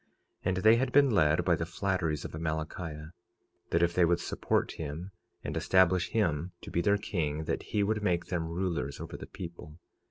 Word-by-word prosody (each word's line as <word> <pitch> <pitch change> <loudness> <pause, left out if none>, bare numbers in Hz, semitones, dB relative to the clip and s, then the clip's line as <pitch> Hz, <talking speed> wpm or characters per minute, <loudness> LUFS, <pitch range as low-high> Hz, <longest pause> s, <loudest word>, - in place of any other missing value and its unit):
46:5 - - -41 0.4
And 95 - +1
they 110 +4 +6
had 130 +2 0
been 140 -2 +5
led 85 -4 +3
by 85 - +4
the 80 - -3
flatteries 85 -3 -1
of - - -5
Amalickiah, 80 0 -4 0.6
that 85 +1 +2
if 85 0 +2
they 90 - +4
would 85 0 +3
support - - 0
him 80 +5 -6 0.3
and - - -4
establish 95 -1 +3
him 90 -5 0
to - - -9
be 85 - +1
their 100 +2 +3
king 80 -7 -2
that - - -2
he 105 - -1
would 105 +1 0
make 85 -4 +1
them 85 -3 -2
rulers 85 -5 -2
over - - -7
the - - -8
people. 85 -3 -9
85 Hz, 195 wpm, -30 LUFS, 80-95 Hz, 0.6 s, they